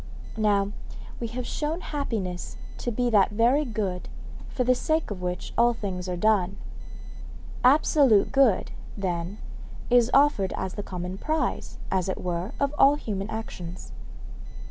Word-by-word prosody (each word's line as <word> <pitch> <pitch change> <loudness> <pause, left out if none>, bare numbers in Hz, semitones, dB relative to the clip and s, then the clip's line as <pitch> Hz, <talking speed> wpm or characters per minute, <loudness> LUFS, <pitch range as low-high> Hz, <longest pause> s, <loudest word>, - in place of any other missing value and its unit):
Now, 205 -2 +2 0.5
we 235 - -2
have 240 +2 -5
shown 315 +6 -2
happiness 220 - -4 0.2
to 240 - -2
be 245 +1 0
that 205 -3 +5
very 240 +7 +3
good 205 -8 -3 0.4
for 250 - -1
the 255 +1 +4
sake 315 +2 0
of 190 -3 -5
which 180 0 -4
all 240 0 +4
things 185 -4 -4
are 180 - -2
done. 195 -1 +2 1.1
Absolute 265 -4 +5
good, 265 -8 +3 0.3
then, 180 0 -3 0.5
is 245 -1 +5
offered 275 -10 +3
as 185 - -3
the - - -4
common 180 -1 -5
prize, 315 +1 -2
as 190 -1 0
it 190 - -2
were, 180 +3 -3
of 280 0 +1
all 280 +2 +7
human 205 -7 -4
actions. 185 -6 -6
215 Hz, 145 wpm, -26 LUFS, 185-255 Hz, 1.1 s, all